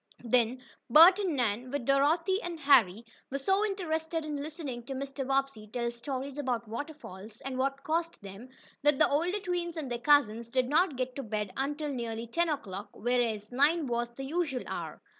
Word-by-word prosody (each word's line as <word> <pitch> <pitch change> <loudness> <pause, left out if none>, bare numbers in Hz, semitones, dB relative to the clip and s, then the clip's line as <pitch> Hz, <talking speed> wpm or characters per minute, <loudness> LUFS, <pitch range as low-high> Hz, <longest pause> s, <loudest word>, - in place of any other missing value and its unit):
Then 245 +1 +1 0.3
Bert 335 - +8
and 370 -7 0
Nan, 240 0 -1
with 280 -2 -3
Dorothy 325 - +2
and 345 -2 -5
Harry 235 -7 +4 0.2
were 275 - -2
so 385 +9 +1
interested 325 -5 -2
in 295 -2 -3
listening 290 -5 -6
to 270 - -4
Mr. 275 0 -4
Bobbsey 270 -5 -1
tell 235 0 -1
stories 265 +3 -5
about 245 -5 -2
waterfalls, 225 -5 -8
and 270 -1 -5
what 275 +1 -1
caused 335 +1 -1
them, 200 +6 -10 0.3
that 295 -1 +4
the 305 - +5
older 345 +8 0
twins 350 -3 -3
and 280 -5 -4
their 240 - -2
cousins 235 -4 +3
did 255 +1 0
not 310 +2 +2
get 255 0 -3
to - - -2
bed 210 -4 -3
until 295 +3 -2
nearly 230 -2 -4
ten 335 +9 0
o'clock, 205 -10 -4
whereas 230 -3 -1
nine 295 +5 +3
was 240 -1 -1
the 270 - -6
usual 295 -4 -1
hour. - - -6
275 Hz, 180 wpm, -30 LUFS, 235-315 Hz, 0.3 s, Bert